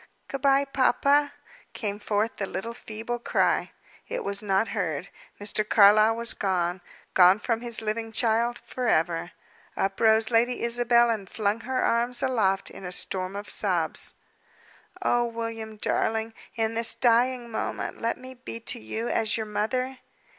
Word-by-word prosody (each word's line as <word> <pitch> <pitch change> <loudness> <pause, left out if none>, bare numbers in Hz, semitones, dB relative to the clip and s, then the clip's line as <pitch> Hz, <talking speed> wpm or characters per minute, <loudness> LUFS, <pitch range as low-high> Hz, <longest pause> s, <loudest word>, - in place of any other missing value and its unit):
"Good 275 - -4
bye, 275 +1 +4
papa!" 280 +2 +2 0.4
came 205 -3 -4
forth 210 +2 -1
the 195 - -2
little 230 +6 -5
feeble 230 +1 -5
cry. - - +1 0.4
It - - -4
was 200 0 -1
not 200 +1 +1
heard. 180 -4 -3 0.3
Mr. 210 +1 -1
Carlyle 215 +1 +6
was 235 0 0
gone, 180 -2 -1 0.3
gone 185 +1 +7
from 230 +1 -2
his 235 -2 0
living 225 +1 -3
child 230 +1 +1
forever. 175 -8 0 0.4
Up 195 0 -1
rose 220 0 +4
Lady 240 +2 +2
Isabel, 235 0 +3
and 205 -4 -4
flung 210 0 0
her 255 +2 -2
arms 240 +2 +1
aloft 200 -7 +1
in - - -11
a 180 - -5
storm 185 +1 -2
of 205 +1 -5
sobs! - - 0 0.9
"Oh, 240 0 +2
William, 230 -2 -5
darling! 225 +1 -1 0.2
in 225 -1 0
this 230 0 +3
dying 240 0 +2
moment 220 - -4
let 230 +1 -1
me 255 0 -10
be 245 -2 -8
to 230 - -4
you 220 - -4
as 225 -1 +1
your 220 - -3
mother!" 250 +5 -2
225 Hz, 155 wpm, -26 LUFS, 205-240 Hz, 0.9 s, gone